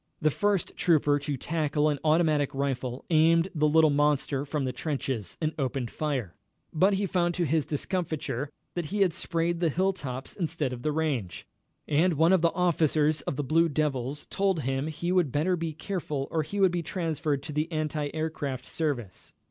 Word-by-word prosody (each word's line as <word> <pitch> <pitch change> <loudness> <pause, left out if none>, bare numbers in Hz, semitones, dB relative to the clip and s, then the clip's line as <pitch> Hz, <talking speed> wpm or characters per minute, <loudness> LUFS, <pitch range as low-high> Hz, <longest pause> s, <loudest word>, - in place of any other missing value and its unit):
The 155 -2 +2
first 205 +2 0
trooper 150 -4 +3
to 145 -1 -3
tackle 150 +1 0
an 145 -2 0
automatic 155 -3 +2
rifle 130 -2 -2
aimed 165 +2 +4
the 150 -2 +2
little 160 0 +5
monster 145 -1 +1
from 145 -1 -2
the 130 - -2
trenches, 130 - -3
and 155 -1 -1
opened 130 -3 -2
fire, 135 - -2 0.4
but 190 +5 +4
he 200 +1 0
found 175 -2 0
to 175 - +1
his 155 0 +1
discomfiture 150 -4 -2 0.2
that 175 -2 -2
he 200 +7 -2
had 185 -4 +4
sprayed 170 -1 -1
the 170 -2 +2
hilltops 150 -7 -2
instead 160 -7 -2
of 120 - -7
the 150 - 0
range, 140 - -2 0.4
and 165 +4 +3
one 165 +4 +4
of 185 - +4
the 170 0 +3
officers 155 -4 +2
of - - -1
the 145 - -2
Blue 165 +5 +3
Devils 145 -2 -1
told 195 -4 +1
him 135 +2 -1
he 165 +3 -3
would 180 -7 +2
better 165 +7 +1
be 165 -2 -3
careful 155 -4 -3
or 160 - +1
he 180 +7 -4
would 190 -2 +5
be 175 -1 -1
transferred 155 -5 -2
to 150 - -6
the 155 +3 -1
anti 155 -2 -1
aircraft 145 -5 -3
service. 130 - -3
155 Hz, 185 wpm, -28 LUFS, 140-170 Hz, 0.4 s, little